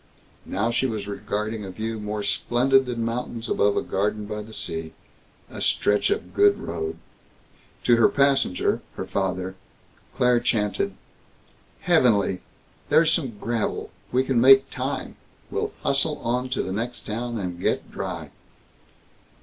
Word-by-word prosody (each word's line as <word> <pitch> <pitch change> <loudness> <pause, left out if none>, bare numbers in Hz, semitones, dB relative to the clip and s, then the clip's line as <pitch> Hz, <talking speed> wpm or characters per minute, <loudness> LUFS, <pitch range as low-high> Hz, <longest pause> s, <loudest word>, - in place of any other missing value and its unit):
Now 105 +5 0
she 130 +3 +1
was 110 -4 -4
regarding 105 +2 -3
a 95 - -6
view 110 +4 -4
more 105 0 -3
splendid 130 +4 +2
than 120 -2 -2
mountains 115 0 -3
above 100 0 +2
a - - +1
garden 105 +2 -1
by 105 0 -4
the 110 +1 -11
sea 80 -6 -3 0.5
a - - -8
stretch 105 0 +2
of 415 - -2
good 405 0 +5
road. 405 -1 -4 0.9
To 120 -1 +5
her 115 - +6
passenger, 140 -9 +2
her - - -4
father, 95 -1 -2 0.6
Claire 125 -1 +4
chanted: 105 -4 0 0.9
"Heavenly! 115 - +3 0.5
There's 165 0 +5
some 130 - -1
gravel. 115 -1 -2 0.2
We 130 +1 +3
can 130 -3 +2
make 135 +1 +7
time. - - -4 0.3
We'll - - -1
hustle - - +2
on 125 +2 -1
to 130 - -1
the 95 - -4
next 120 +4 -3
town 115 +2 -3
and 90 -4 -4
get - - -1
dry." - - -5
115 Hz, 140 wpm, -24 LUFS, 105-125 Hz, 0.9 s, make